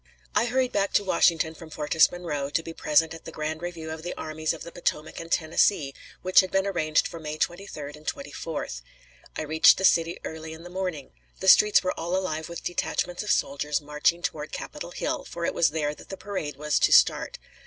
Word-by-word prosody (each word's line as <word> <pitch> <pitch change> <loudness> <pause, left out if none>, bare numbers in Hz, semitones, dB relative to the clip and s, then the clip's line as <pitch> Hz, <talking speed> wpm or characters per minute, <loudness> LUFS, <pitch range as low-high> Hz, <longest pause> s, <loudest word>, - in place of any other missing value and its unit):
I - - +3
hurried 255 +1 +1
back 200 -1 0
to 205 - +4
Washington 165 -4 +2
from 160 0 -12
Fortress 155 +1 +3
Monroe 150 -6 -3
to 165 +3 0
be 165 - -7
present 160 +1 +2
at 165 - -11
the - - -7
grand 155 +1 -4
review 170 -2 -5
of 160 0 -6
the 175 +2 -5
Armies 155 0 -2
of 165 - -6
the 170 - -9
Potomac 160 -3 -3
and 165 0 -8
Tennessee, 160 -2 +2 0.3
which 185 0 +6
had 185 - +3
been 195 +1 +1
arranged 155 -6 +1
for 165 - -9
May 155 -1 -5
23d 155 -5 -4
and 150 0 -16
24th. 165 - -5 0.5
I - - -3
reached 155 +1 +6
the 190 - +1
city 165 -1 +3
early 160 0 -6
in 160 +1 -11
the 175 - -10
morning. 180 -7 -4 0.3
The 190 - -3
streets 210 +2 +7
were 185 - 0
all 170 +2 -1
alive 160 -4 -2
with 170 - -7
detachments 175 0 -2
of 210 - -6
soldiers 145 -3 +1
marching 150 +4 0
toward 150 -3 -3
Capitol - - -6
Hill, - - -3
for 170 0 -5
it - - 0
was 170 - +3
there 150 -1 -1
that - - -15
the 195 - -6
parade 185 -8 -4
was 150 0 0
to - - +3
start. - - +4
165 Hz, 215 wpm, -26 LUFS, 155-180 Hz, 0.5 s, streets